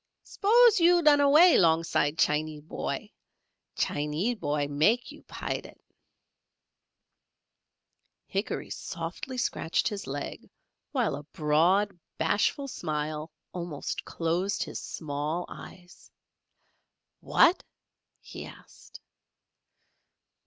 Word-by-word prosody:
Spose 455 +1 +4
you 345 0 +5
lun 295 -1 +6
away 305 +5 +7
longside 160 -2 +2
Chinee 155 0 +1
boy 150 - -5 0.6
Chinee 150 +10 -1
boy 150 -8 -1
makee 160 +13 +1
you - - -20
Pilat." - - -5 2.5
Hickory 200 +6 -3
softly 180 +9 -6
scratched 210 -8 0
his 205 -2 -6
leg 140 +1 -6 0.4
while - - 0
a 145 - -7
broad, 170 +6 +1 0.2
bashful 205 - +1
smile, 155 - -4 0.2
almost 170 -5 -5
closed 175 +4 -1
his - - -6
small 155 +3 -4
eyes. 175 -1 -13 1.1
"Wot!" 340 +3 +4 0.6
he - - -9
asked. - - -15
170 Hz, 90 wpm, -28 LUFS, 150-240 Hz, 2.5 s, away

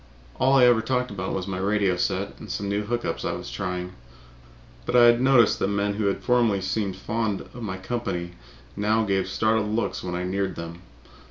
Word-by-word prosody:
All 130 +2 +4
I 125 - +7
ever 120 -2 +5
talked 125 +1 -1
about 95 -2 -4
was 90 - -3
my 95 -1 -4
radio 100 -1 +1
set 90 - -2
and - - -10
some 100 - -3
new 100 +1 0
hook 120 +2 -2
ups - - -3
I - - -1
was - - -6
trying, 90 +4 -4 0.9
but 125 - -2
I 120 -1 +8
had 120 0 +5
noticed 130 -3 +4
that - - +1
men 100 0 0
who 100 -1 +1
formerly 120 -5 +2
had 95 - -4
seemed 95 -1 -1
to - - -14
be - - -19
fond 110 -3 -1
of 120 - -11
my 100 -4 -4
company 95 -4 -3 0.4
now 110 +2 +1
gave 95 -3 0
startled 110 +2 +1
looks 115 - -1
when 90 -1 -3
I 90 - -2
neared 95 0 -2
them. 85 +1 -7
100 Hz, 220 wpm, -25 LUFS, 95-115 Hz, 0.9 s, I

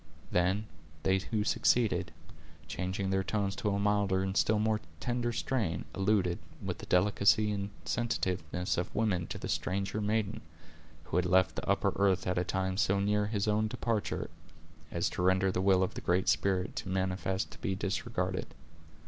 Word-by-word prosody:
Then, 95 +4 +2 0.4
they 95 0 +3
who 105 +2 -1
succeeded, 115 +1 +2 0.6
changing 95 +1 -2
their 95 0 +1
tones 100 +1 -1
to 105 - 0
a 100 - 0
milder 100 -2 +2
and 95 0 -2
still 110 +1 +3
more 110 0 +1 0.2
tender 120 +2 -1
strain, 110 -9 -1
alluded, 95 -3 +1 0.2
with - - -4
the - - -9
delicacy 100 +3 +4
and 100 -1 -2 0.2
sensitiveness 95 -7 -1
of 90 - -4
women, 95 -6 +1
to - - -5
the - - -5
stranger 100 +3 -1
maiden, 105 0 0 0.6
who - - -2
had 90 - +2
left 95 0 +3
the - - -4
upper 100 -1 +2
earth 95 -2 +2
at 90 -1 +1
a - - +1
time 95 0 -1
so 100 0 +2
near 105 +1 +1
his 105 -1 -1
own 105 +1 +2
departure, 110 0 -2 0.6
as - - 0
to - - -3
render 95 +1 +3
the 90 - -1
will 95 -1 +4
of 95 - -2
the - - -6
Great 90 +1 +1
Spirit 95 -1 +1
too - - -4
manifest 95 0 -1
to - - -12
be 95 - -1
disregarded. 95 0 -2
100 Hz, 175 wpm, -31 LUFS, 95-105 Hz, 0.6 s, delicacy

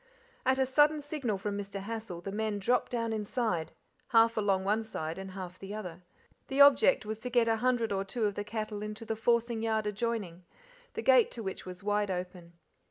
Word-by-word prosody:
At 260 - +4
a 265 - +3
sudden 295 +3 +4
signal 285 -8 -2
from 200 +1 -3
Mr. 200 0 -5
Hassal 220 -5 -5
the 195 - -5
men 215 0 -1
dropped 245 +7 +1
down 230 -2 -1
inside, 210 -6 -1 0.4
half 230 -1 +5
along, 200 -3 +1
one 210 +3 +1
side 170 -6 -5
and 190 0 -6
half 185 -1 -7
the 195 +2 -7
other. 180 -5 -7 0.5
The 270 - -2
object 280 -3 +6
was 215 0 -4
to 250 - -5
get 240 -1 +3
a 225 0 +2
hundred 240 -2 +1
or 195 -1 0
two 215 +3 -2
of 205 - 0
the 205 - -4
cattle 215 -1 -4
into 210 +2 -6
the 225 - -2
forcing 235 0 +1
yard 220 -1 0
adjoining, 210 -4 -3 0.5
the - - -3
gate 260 -3 +6
to 230 - -6
which 190 -1 -5
was 180 +1 -8
wide 205 0 +1
open. 180 -2 -5
215 Hz, 205 wpm, -31 LUFS, 195-235 Hz, 0.5 s, object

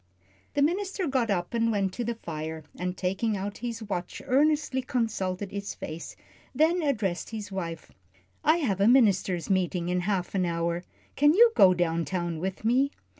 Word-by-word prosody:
The 285 - +3
minister 380 +4 0
got 260 -6 0
up 180 -1 -1
and 230 -1 +2
went 195 -3 0
to 240 - -3
the 235 0 -2
fire, 160 -5 -6
and 180 +1 -3
taking 195 +4 -1
out 200 +1 -5
his 235 -1 -4
watch 180 -4 -4
earnestly 290 0 +2
consulted 205 -7 -2
its 200 0 -4
face, 160 +2 -7 0.4
then 325 +5 +3
addressed 210 - -1
his 215 -2 -6
wife. 165 -4 -5 0.5
"I 315 +2 +4
have 205 - 0
a 200 - +5
ministers' 200 -7 +3
meeting 180 -2 0
in 180 0 +1
half 185 -1 -1
an 190 -2 +1
hour. 170 0 -1 0.3
Can 295 +3 +5
you 465 +3 +7
go 185 -1 +7
down 170 -1 0
town 175 -3 -2
with 190 +4 -4
me?" 260 +5 +3
200 Hz, 175 wpm, -27 LUFS, 180-250 Hz, 0.5 s, you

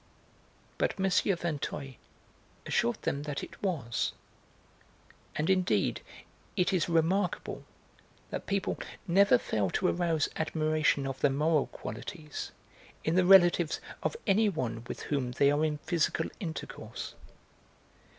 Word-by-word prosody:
But - - 0
M. 190 - +2
Vinteuil 155 -7 0 0.7
assured 120 0 +1
them 140 - -1
that 145 -1 -4
it - - -10
was, 150 - -1 1.2
and 150 - 0
indeed 180 - +2 0.5
it 180 +1 +2
is 175 -2 +1
remarkable 170 +5 0 0.7
that - - -4
people 195 -1 -1 0.3
never 190 -6 +6
fail 105 -5 -1
to 180 - +1
arouse 165 -4 +1
admiration 155 -3 +1
of 135 -1 -4
their - - +4
normal 150 +2 +2
qualities 155 -4 -7 0.5
in 160 - +1
the 185 +1 +4
relatives 175 -3 +6 0.2
of - - -1
anyone 190 - +1
with - - -6
whom 130 -4 -1
they 140 +2 +4
are 145 +2 +2
in 155 -1 +1
physical 160 0 0
intercourse. 165 -5 -6
160 Hz, 120 wpm, -30 LUFS, 140-180 Hz, 1.2 s, never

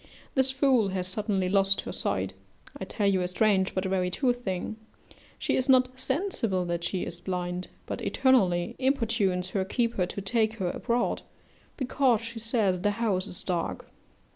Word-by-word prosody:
This 265 -1 +6
fool 265 -5 +3
has 185 -1 -2
suddenly 195 -1 -1
lost 195 +1 +3
her - - -6
sight: - - -2 0.4
I - - -5
tell 210 - -2
you 195 -2 +3
a 180 - 0
strange, 190 0 +2
but 185 +1 0
a - - -1
very 185 -1 +1
true 245 +7 +1
thing 215 -3 -4 0.6
she - - 0
is 260 +1 0
not 255 -1 +6
sensible 260 - -1
that 170 -1 -2
she 185 +1 -1
is 170 +1 -7
blind, 180 0 -3 0.2
but - - -5
eternally 190 -10 +2
importunes 225 -9 +1
her 195 -1 0
keeper 215 -2 0
to 190 - -5
take 220 +2 +1
her 185 -5 -1
abroad, 240 0 -1 0.6
because 260 -3 +2
she 230 0 -6
says 215 -5 +1
the 205 +1 0
house 205 -5 0
is 180 - -9
dark. 175 -3 -2
200 Hz, 170 wpm, -28 LUFS, 185-240 Hz, 0.6 s, This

